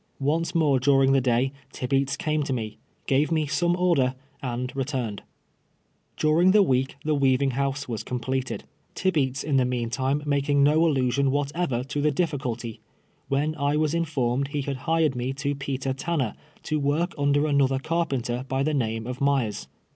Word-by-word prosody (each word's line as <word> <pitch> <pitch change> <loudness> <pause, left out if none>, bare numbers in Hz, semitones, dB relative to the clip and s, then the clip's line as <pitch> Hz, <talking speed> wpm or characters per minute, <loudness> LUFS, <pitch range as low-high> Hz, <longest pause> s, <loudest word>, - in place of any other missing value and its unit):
Once 160 +5 0
more 150 -5 +3
during 135 0 +4
the 135 -1 +4
day 125 +1 +1 0.2
Tibeats 135 +1 0
came 155 0 0
to 140 -2 -1
me, 110 -3 -4 0.3
gave 140 +4 +2
me 155 -2 +2
some 170 +4 +1
order, 170 -8 +2 0.3
and 125 0 -4
returned. 130 -6 -2 1.0
During 160 +4 +4
the 210 -1 +6
week 130 -5 +1
the 155 - +2
weaving 135 -1 +2
house 140 +2 -2
was 115 -4 -3
completed 130 +1 -3 0.2
— - - -40
Tibeats 140 -8 0
in 145 -3 +1
the 130 - +4
meantime 125 +3 -1
making 140 0 +2
no 155 +3 +4
allusion 135 -2 +2
what 145 +1 0
ever 145 -9 -1
to 145 +2 -3
the 150 +1 +3
dithculty 130 -8 -2 0.3
— - - -40
when 145 +3 +1
I 145 -1 0
wa^s 155 0 +1
informed 140 -6 0
he 145 0 -3
had 140 -1 -3
hired 160 -4 +2
me 125 +2 -2
to 140 +1 -2
Peter 135 -1 -3
Tanner, 135 -4 -1 0.3
to 155 -1 -1
work 150 +5 0
under 145 +1 +2
another 140 -3 +2
car 165 +5 0
penter 125 -1 -3
by 135 +1 0
the 155 +2 0
name 115 -5 -1
of 125 +1 -6
Myers. 135 -7 0
140 Hz, 175 wpm, -25 LUFS, 130-150 Hz, 1.0 s, the